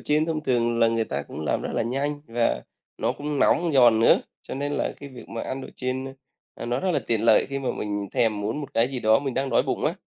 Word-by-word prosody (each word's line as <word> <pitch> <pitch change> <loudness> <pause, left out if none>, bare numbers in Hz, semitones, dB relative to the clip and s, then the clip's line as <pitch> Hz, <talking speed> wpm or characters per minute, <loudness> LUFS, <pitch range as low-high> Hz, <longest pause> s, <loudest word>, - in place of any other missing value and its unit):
chiên 150 +1 +1
thông 160 -2 -2
thường 120 -4 +1
là 115 -1 +5
người 115 -1 +1
ta 70 -4 -3
cũng 75 - -9
làm 75 - -1
rất - - -4
là - - +1
nhanh 140 +5 -2
và 115 - 0 0.4
nó - - 0
cũng 145 -1 -4
nóng, 170 +3 +3
giòn 120 -4 +6
nữa, 115 - +5 0.2
cho - - -7
nên 145 +1 -2
là - - -1
cái 140 - -8
việc 125 -4 -12
mà 115 - -5
ăn 130 +1 -4
đồ - - -8
chiên, 130 +1 -3
ơ, 135 - -6 0.4
ờ, - - -7
nó 120 +2 -1
rất 190 - 0
là - - +2
tiện 115 -2 +1
lợi 115 - +5
khi 140 0 -3
mà 130 - -3
mình 100 -1 -3
thèm 110 -3 +1
muốn 110 +9 -2
một 140 0 -8
cái 115 +2 +3
gì 130 -2 -4
đó 110 0 +5
mình 135 -2 -3
đang 135 0 -1
đói 115 - +4
bụng - - -2
á, - - +1
125 Hz, 280 wpm, -25 LUFS, 115-140 Hz, 0.4 s, giòn